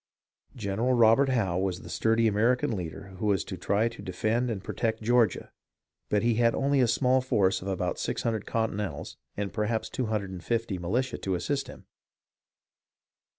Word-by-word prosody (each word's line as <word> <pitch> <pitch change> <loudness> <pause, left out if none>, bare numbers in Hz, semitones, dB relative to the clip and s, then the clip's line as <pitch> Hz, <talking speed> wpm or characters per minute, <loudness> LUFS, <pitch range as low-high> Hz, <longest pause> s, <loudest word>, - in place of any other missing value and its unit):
General 110 +2 0
Robert 120 +4 +5
Howe 100 -9 +1
was 95 -2 -2
the - - -10
sturdy 115 0 +2
American 115 +3 +2
leader 95 +2 -6
who 105 - -1
was 100 -2 +2
to 95 - -6
try 100 +5 +1
to 115 - -11
defend 110 +7 -1
and 105 -5 -4
protect 110 -1 -2
Georgia, 120 -3 +2 0.6
but 105 +1 +1
he 120 0 +3
had 115 -1 +3
only 140 0 +2
a 125 - +4
small 130 +2 +3
force 100 -7 +1
of 95 - -7
about 90 -2 -2
600 110 -3 -2
Continentals 105 -8 -2 0.2
and 100 -1 -3
perhaps 110 0 -1
250 110 -2 -2
militia 120 +10 -1
to 95 -1 -1
assist 135 +10 -2
him. - - -12
110 Hz, 155 wpm, -28 LUFS, 95-120 Hz, 0.6 s, Robert